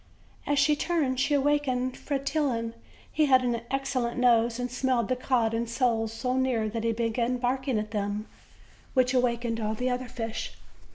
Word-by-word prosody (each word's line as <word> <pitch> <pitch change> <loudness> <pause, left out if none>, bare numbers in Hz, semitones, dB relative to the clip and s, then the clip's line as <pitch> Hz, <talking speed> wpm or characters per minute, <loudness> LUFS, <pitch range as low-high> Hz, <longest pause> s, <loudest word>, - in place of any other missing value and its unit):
As 290 - +1
she 290 +2 +4
turned 295 -5 0
she 290 +2 +2
awakened 270 -3 +1
Fretillon. 275 -5 -1 0.4
He 305 -1 +2
had 260 -2 +5
an 240 -2 0
ex 270 0 -2
cellent 240 -2 -1
nose 235 -1 +3
and 245 -1 -3
smelled 250 -1 0
the 255 - +2
cod 245 -3 +1
and 230 0 -1
soles 235 -2 +1
so 250 +3 -2
near 255 -4 +1
that 225 +1 -4
he 230 - +2
began 235 +2 0
barking 260 0 0
at 215 0 -3
them, 205 0 -2 0.7
which 255 0 +3
awakened 235 -2 +1
all 215 0 -1
the 250 +3 -1
osher 250 0 -2
fish. 225 -2 -5
250 Hz, 175 wpm, -28 LUFS, 230-260 Hz, 0.7 s, had